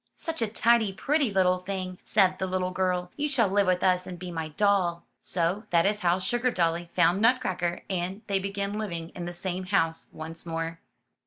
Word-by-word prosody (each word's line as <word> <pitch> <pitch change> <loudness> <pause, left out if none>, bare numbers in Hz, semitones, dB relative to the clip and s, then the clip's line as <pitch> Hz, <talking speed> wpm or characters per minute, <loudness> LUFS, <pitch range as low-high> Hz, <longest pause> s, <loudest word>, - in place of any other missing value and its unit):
'*Such 325 -6 -5
a 225 - +2
tidy, 225 0 +3
pretty 280 +7 +1
little 185 -1 +3
thing,'* 185 -1 -5
said 185 -3 +3
the 190 - -1
little 185 0 -1
girl. 180 -1 -1
*'You 295 0 0
shall 250 -7 +3
live 200 0 +2
with 180 -1 +2
us, 185 -1 +2
and 180 - -6
be 180 0 -7
my 160 -2 -3
doll. 180 0 +1 0.2
So 180 +5 0
that 170 -1 +3
is 205 +1 +1
how 175 -2 +2
Sugardolly 185 -7 0
found 185 +4 +4
Nutcracker 190 -8 +1
and 190 +3 -3
they 200 -1 0
began 200 +1 -3
living 170 -6 -4
in 175 - -7
the 175 - -4
same 185 +1 -4
house 165 -4 0
once 160 +1 -7
more. 165 0 -4
185 Hz, 190 wpm, -27 LUFS, 175-205 Hz, 0.2 s, found